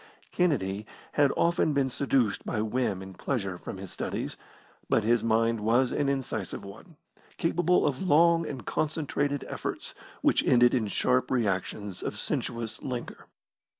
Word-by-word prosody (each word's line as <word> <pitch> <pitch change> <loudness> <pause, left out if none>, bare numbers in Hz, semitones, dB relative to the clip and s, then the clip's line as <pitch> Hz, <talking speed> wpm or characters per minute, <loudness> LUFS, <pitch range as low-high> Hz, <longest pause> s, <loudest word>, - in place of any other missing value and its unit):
Kennedy 110 - 0 0.2
had 145 -2 +3
often 170 -2 +2
been 135 -2 +1
seduced 125 -6 +1
by - - -2
whim 110 -3 -1
and 95 -1 -11
pleasure 100 -9 -2
from - - -7
his 95 -1 -8
studies, - - -4 0.5
but 110 - +3
his 115 +1 +3
mind 115 0 +2
was 120 +4 +2
an 145 -1 +1
incisive 120 -9 -3
one, 155 - -12 0.4
capable 175 +1 +2
of 140 -3 0
long 170 -1 +5
and 130 -7 -6
concentrated 145 -2 -1
efforts - - -4 0.3
which - - +4
ended 120 -1 +5
in 120 -5 +1
sharp 125 +5 +1
reactions 100 -4 -1
of - - -4
sensuous 115 -2 -3
languor. 125 -2 -6
125 Hz, 145 wpm, -28 LUFS, 105-145 Hz, 0.5 s, long